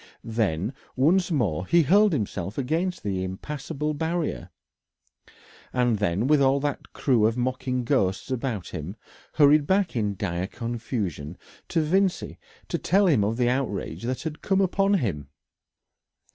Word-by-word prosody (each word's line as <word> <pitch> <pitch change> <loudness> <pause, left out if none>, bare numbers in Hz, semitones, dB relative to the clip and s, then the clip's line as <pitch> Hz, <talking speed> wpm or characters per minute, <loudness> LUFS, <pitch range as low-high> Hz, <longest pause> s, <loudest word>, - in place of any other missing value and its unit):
Then 110 - -1 0.2
once 170 +8 +3
more 100 - 0
he 170 -1 +5
hurled 200 +7 +5
himself 100 - -3
against 165 +7 -1
the 95 -2 -2
impassable 150 - -4
barrier, 165 +2 -2 1.2
and 120 -4 +1
then 100 +2 0
with 145 +1 +4
all 135 +1 +4
that 145 -1 -3
crew 120 -6 +2
of 115 +2 -2
mocking 125 0 -1
ghosts 115 -3 0
about 120 -7 -3
him, 80 +7 -6 0.4
hurried 145 -1 +5
back 190 -4 +1
in 105 -3 0
dire 90 -1 -2
confusion 110 - -4 0.3
to 165 - +1
Vincey 185 +4 0 0.3
to - - -2
tell 200 +2 +3
him 140 - +4
of 110 +3 -1
the 125 -1 +2
outrage 115 -9 -2
that 125 +5 -3
had 155 -2 -5
come 195 -1 +1
upon 195 +1 +2
him. 85 - -2
125 Hz, 145 wpm, -25 LUFS, 105-155 Hz, 1.2 s, he